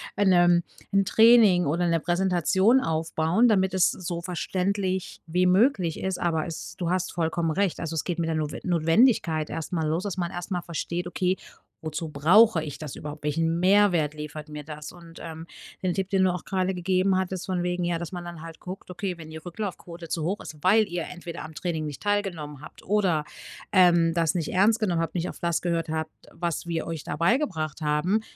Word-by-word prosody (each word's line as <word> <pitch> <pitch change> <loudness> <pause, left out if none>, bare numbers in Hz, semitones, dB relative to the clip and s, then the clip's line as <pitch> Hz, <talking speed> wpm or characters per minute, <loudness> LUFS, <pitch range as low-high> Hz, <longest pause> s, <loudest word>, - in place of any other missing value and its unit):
ein, 200 -1 +3
ähm, 175 -1 +5 0.3
'n 195 0 +4
Training 220 -4 +6
oder 165 +5 0
'ne 165 -1 +2
Präsentation 190 +6 +3
aufbauen, 165 +4 +1
damit 190 -3 +2
es 185 -1 +4
so 170 -1 -5
verständlich 185 +2 -2
wie 180 +3 +1
möglich 185 - +3
ist.“ 190 -1 -3
Aber 160 -3 0
es 165 - -7
du 175 -2 -2
hast 185 0 0
vollkommen 165 -1 -1
recht. 195 +2 0
Also, 165 -1 -4
es 155 - -2
geht 175 -2 -2
mit 165 -1 -1
der 160 - 0
Notwen 150 -1 -3
Notwendigkeit 165 -1 +2
erstmal 160 +1 -3
los, 165 +4 -1
dass 205 -4 -3
man 175 -2 -2
erstmal 175 0 -4
versteht: 170 +1 -4
„Okay, 180 +1 0 0.5
wozu 155 +1 -3
brauche 165 +6 +5
ich 145 -3 -6
das 150 -4 -7
überhaupt? 150 0 -8
Welchen 165 +2 0
Mehrwert 180 -5 +4
liefert 150 0 -7
mir 150 -1 -7
das?“ 150 0 -8
Und, 170 -1 -13
ähm, 160 0 -7 0.4
den 185 -2 0
Tipp, 190 0 -2
den 190 -1 +2
du 185 -1 +3
auch 180 - -6
gerade 190 -1 0
gegeben 185 +1 +1
hattest, 185 -1 -2
von 185 -2 -1
wegen, 180 0 -1
ja, 175 -1 0
dass 170 +1 -6
man 175 -1 -5
dann 175 -2 -8
halt 165 0 -10
guckt: 185 +1 -8
„Okay, 180 0 -4
wenn 160 -2 -10
die 160 - -9
Rücklaufquote 175 -1 -7
zu 160 0 -2
hoch 190 +6 -1
ist, - - -8
weil 210 +3 +4
ihr 175 -1 -3
entweder 175 -1 -7
am 160 - -9
Training 160 -1 -3
nicht 150 -2 -7
teilgenommen 175 -9 -2
habt, - - -13
oder, 185 -7 +1 0.5
ähm, 175 -3 +5
das 165 -2 +1
nicht 170 -4 -2
ernst 210 +5 +4
genommen 180 -7 +1
habt, 165 - -3
nicht 175 -1 -2
auf - - -8
das 170 -1 +1
gehört 170 -2 -1
habt, 160 0 -2 0.2
was 170 0 -3
wir 165 -1 -2
euch 165 -3 -5
da 145 - -5
beigebracht 170 - 0
haben. 155 +8 +1
175 Hz, 205 wpm, -26 LUFS, 160-185 Hz, 0.5 s, Training